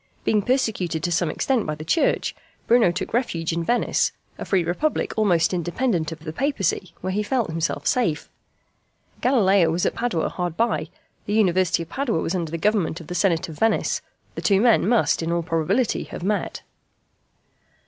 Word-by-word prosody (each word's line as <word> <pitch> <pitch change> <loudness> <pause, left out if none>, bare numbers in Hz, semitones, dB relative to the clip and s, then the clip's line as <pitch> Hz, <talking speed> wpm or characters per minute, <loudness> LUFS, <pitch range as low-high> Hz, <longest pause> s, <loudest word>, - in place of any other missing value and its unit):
Being 210 -1 +2
persecuted 200 - 0
to 175 - 0
some 170 -1 +1
extent 240 - 0
by 155 - -2
the 155 +1 -9
Church, 320 - +1 0.3
Bruno 230 -6 +4
took 175 - -5
refuge 170 -9 -1
in 170 0 -1
Venice 240 +8 +1 0.3
a - - -4
free 190 -3 +2
republic 180 - -1
almost 185 -6 +2
independent 175 -1 -1
of 160 -1 -8
the 155 -1 -6
Papacy 195 - -1
where 185 +1 -2
he 210 - 0
felt 225 -4 -1
himself 165 0 -2
safe. 175 -12 +1 0.9
Galileo 200 -9 +4
was 170 +2 0
at - - +1
Padua 230 -9 -1
hard 175 -2 -4
by: 230 +1 0 0.4
the 205 - -1
University 185 -5 +2
of - - -15
Padua 265 - -1
was 165 - -2
under 170 -4 -2
the 165 - -3
government 190 -3 0
of 165 - -10
the - - -3
Senate 175 -2 +1
of 160 -2 -10
Venice: 225 -1 +1 0.3
the - - -6
two 195 -2 +3
men 225 -3 +4
must 235 -6 +2
in 165 +1 -2
all 170 0 0
probability 175 +9 0
have - - -8
met. 205 +2 -2
185 Hz, 180 wpm, -23 LUFS, 165-225 Hz, 0.9 s, Bruno